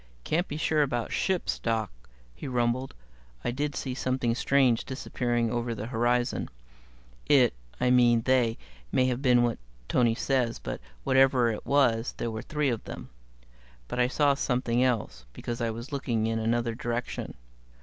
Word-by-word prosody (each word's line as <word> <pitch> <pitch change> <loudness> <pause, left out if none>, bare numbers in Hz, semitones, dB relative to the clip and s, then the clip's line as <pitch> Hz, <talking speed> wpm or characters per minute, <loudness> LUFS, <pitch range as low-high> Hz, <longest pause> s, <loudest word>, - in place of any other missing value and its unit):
"Can't 175 +4 0
be 150 - -5
sure 155 -1 +2
about 120 -5 -1
ships, 190 -2 0
Doc," 110 -3 -1 0.4
he - - -8
rumbled. 125 +1 0 0.5
"I - - +1
did 145 +3 -2
see 130 - -3
something 130 -2 0
strange 130 -2 +3
disappearing 120 -3 -1
over 120 -1 -2
the 105 - -5
horizon. 120 +1 0 0.8
It 130 -5 +5 0.3
I 125 - +2
mean 120 -2 +5
they 125 -3 +2 0.3
might 130 - +3
have 125 +1 -2
been 125 -3 +4
what 120 -1 0 0.3
Tony 120 -3 +2
says; 125 -2 0
but - - -6 0.2
whatever 130 - +4
it 105 - -6
was, 125 -5 +2
there 115 - -2
were 110 0 -4
three 150 +1 -1
of 115 -3 -2
them. - - -8 0.8
But 125 - -4
I 125 - +4
saw 145 +2 +3
something 125 -3 0
else, 105 - -1
because 120 0 -5
I 115 - +1
was 115 +5 -6
looking 120 -6 -1
in 115 0 0
another 115 +1 0
direction. 120 +1 -4
120 Hz, 160 wpm, -28 LUFS, 115-130 Hz, 0.8 s, It